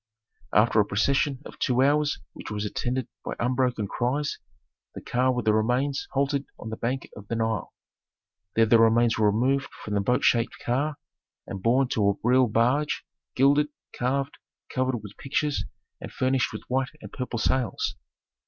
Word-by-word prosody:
After 110 +1 +4
a 105 - +5
procession 135 +6 +1
of - - -11
two 125 0 +2
hours 145 +1 +2 0.2
which - - -9
was 105 0 -3
attended 125 +4 -2 0.2
by - - -4
unbroken 125 -3 0
cries, 135 +7 -1 0.6
the - - -6
car 130 +1 +1
with 125 -1 -2
the 110 - +4
remains 125 +6 +1
halted 140 0 +1
on 110 - -7
the - - -3
bank 125 +4 -2
of 100 0 -11
the 115 - -2
Nile. 110 -4 -1 0.8
There 115 - +5
the 115 +1 +5
remains 115 0 +4
were 105 -1 +5
removed 130 +6 +1 0.2
from 105 - -4
the 100 - +2
boat 125 +5 +1
shaped 115 +1 +2
car 140 +5 -1 0.5
and 95 - -6
borne 125 +5 +3
to 100 -2 +2
a - - +3
real 125 +2 +4
barge 125 +7 +1 0.3
gilded, 145 +3 +4 0.3
carved, 135 +2 -1 0.3
covered 130 -4 0
with 105 -1 -10
pictures, 145 +1 -1 0.4
and - - -7
furnished 130 0 +1
with - - -7
white 130 +1 0
and - - -11
purple 125 -2 -4
sails. 125 +2 0
125 Hz, 170 wpm, -26 LUFS, 115-135 Hz, 0.8 s, a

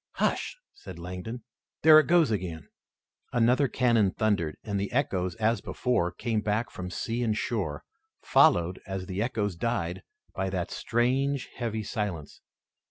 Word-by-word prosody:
"Hush!" - - -1 0.2
said 95 -4 -11
Langdon, 90 +7 -6 0.4
"there 155 0 +9
it 155 - +1
goes 170 -6 +4
again!" 90 -6 -3 0.6
Another 125 +4 +3
cannon 115 -5 +3
thundered, 100 -7 0
and 100 -2 -2
the 100 - -3
echoes, 95 -9 0
as 110 +3 +1
before, 120 -9 0
came 115 -3 -1
back 105 +1 -1
from 90 0 -6
sea 115 +6 -3
and 110 -3 0
shore, 95 -14 -2 0.4
followed, 85 +1 +4
as 95 -1 -4
the 95 +2 -3
echoes 105 -5 -1
died, 90 -3 -2 0.3
by 95 0 -2
that 95 -1 -3
strange, 130 +4 0
heavy 110 -3 -3
silence. 100 - -4
105 Hz, 145 wpm, -28 LUFS, 90-120 Hz, 0.6 s, there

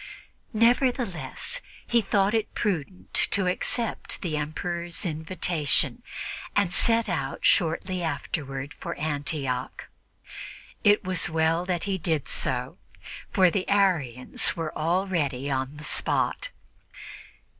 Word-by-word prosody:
Nevertheless, 240 - +2 0.2
he 235 -1 +3
thought 200 0 +2
it 220 -1 -1
prudent 185 -3 -2 0.2
to 200 -2 +2
accept 220 +5 -1
the 165 -4 -1
Emperor's 170 +3 -3
invitation 160 -1 +1 0.5
and 200 -3 +2
set 230 +3 +3
out 140 -8 -2
shortly 180 +2 +2
afterward 145 -3 -3
for - - -6
Antioch. 145 -4 -3 1.0
It 205 +1 +5
was 180 -2 +2
well 160 +2 +1
that 175 -2 -1
he 195 -2 -1
did 160 -3 0
so, - - -1 0.5
for 185 -2 +4
the 190 0 -2
Arians 165 - +2
were 165 -2 -4
already 160 -6 0
on 130 +2 -2
the 150 - -9
spot. - - 0
175 Hz, 110 wpm, -26 LUFS, 150-195 Hz, 1.0 s, It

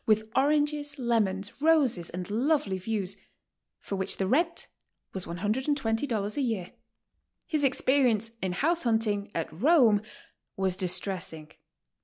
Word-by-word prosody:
151 215 0 +2
with 220 - -29
oranges, 290 +1 +1
lemons, 215 -4 -1
roses 280 - +3
and 180 +1 -6
lovely 250 -4 +1
views, 195 -1 -2 0.6
for 200 - -5
which 190 0 -2
the 190 - 0
rent 335 - +1 0.5
was 190 -2 -4
$120 225 - -1
a - - +1
year. 220 -9 -2 0.7
His 305 -5 -1
experience 255 -4 +2
in 185 -1 -1
house 330 - +1
hunting 220 -4 +1
at 165 - -1
Rome 230 - +4 0.6
was 190 -1 +1
distressing. 180 -4 -3
220 Hz, 125 wpm, -28 LUFS, 190-280 Hz, 0.7 s, Rome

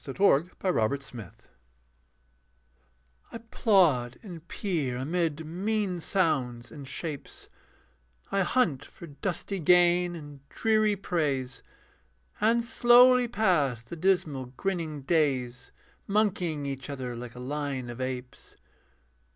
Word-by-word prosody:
THE 135 - -6
TRIUMPH 180 -3 +3
OF 140 -5 0
MAN 110 -8 -8 2.0
I - - -6
plod 185 - +2
and 170 -5 -10
peer 155 - -2
amid 160 +2 -1
mean 190 +2 -1
sounds 130 -10 -1
and 145 -3 -9
shapes, 145 +1 -6 0.8
I 195 - +2
hunt 175 - +1
for - - -12
dusty 180 +5 -4
gain 175 +1 +4
and 145 -3 -10
dreary 215 -2 +2
praise, 145 -9 -2 0.8
And 230 +2 +2
slowly 245 +1 +6
pass 170 - +1
the 115 - -8
dismal 160 -7 0
grinning 165 -7 -3
days, 130 -5 0 0.4
Monkeying 185 -8 0
each 135 0 -5
other 130 -3 -5
like 120 0 -8
a - - -9
line 135 -1 -3
of 120 +2 -8
apes. 130 -1 -6
160 Hz, 110 wpm, -28 LUFS, 130-195 Hz, 2.0 s, slowly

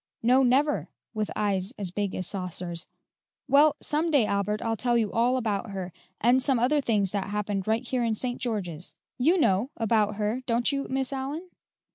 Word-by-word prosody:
"No, 250 +3 +5
never," 270 +4 +2 0.2
with 215 -2 -2
eyes 200 +1 0
as 195 -4 -3
big 200 0 -2
as 185 - -3
saucers. 180 -2 -4 0.6
"Well, 290 +2 +5
some 310 +3 0
day, 285 -8 +4
Albert, 205 +1 -1
I'll 225 0 0
tell 240 +2 +1
you 220 -3 0
all 245 +3 +2
about 220 -2 -2
her, 190 -3 -5 0.3
and 245 +3 +4
some 260 0 +2
other 270 +5 +2
things 205 -7 +1
that 200 -2 -2
happened 205 -1 -2
right 220 +1 0
here 255 -2 0
in 225 -2 +1
St. 245 +2 -4
George's. 185 -8 -4 0.2
You 330 +9 +3
know, 205 -2 +2
about 215 -2 +1
her, 215 +4 -1
don't 235 +3 +2
you, 275 0 -2
Miss 265 0 0
Allyn?" 290 +7 -5
225 Hz, 185 wpm, -27 LUFS, 200-260 Hz, 0.6 s, No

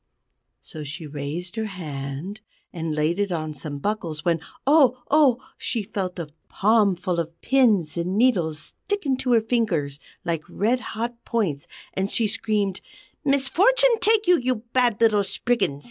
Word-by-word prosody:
So 155 - -8
she 150 +3 -7
raised 150 +7 -5
her 220 -1 -1
hand 155 +1 -6 0.3
and 165 -3 -3
laid 155 +5 0
it 200 -2 0
on 155 -2 -2
some 145 0 -5
buckles, 165 -3 -3
when 170 -1 +2 0.3
oh! 265 -4 +4
oh! 285 -5 +5 0.2
she 230 -4 -2
felt 190 -3 -4
a 165 -3 -5 0.2
palmful 195 -4 +2
of 165 0 -5
pins 220 - +3
and 180 +3 -1
needles 185 -11 +2 0.3
stick 410 -3 -1
into 260 -2 +1
her 230 - +5
fingers 185 - 0 0.3
like 165 -2 -1
red 230 +6 +1 0.2
hot 235 +1 -4
points; 190 - -1 0.3
and 190 +1 -1
she 225 0 +1
screamed: 205 -3 -1 0.4
"Misfortune 385 - +4
take 435 +2 +3
you, 355 -2 +5
you 255 +1 0 0.2
bad 245 -4 +2
little 215 -3 +4
Spriggans!" 200 - 0
205 Hz, 150 wpm, -24 LUFS, 165-245 Hz, 0.4 s, oh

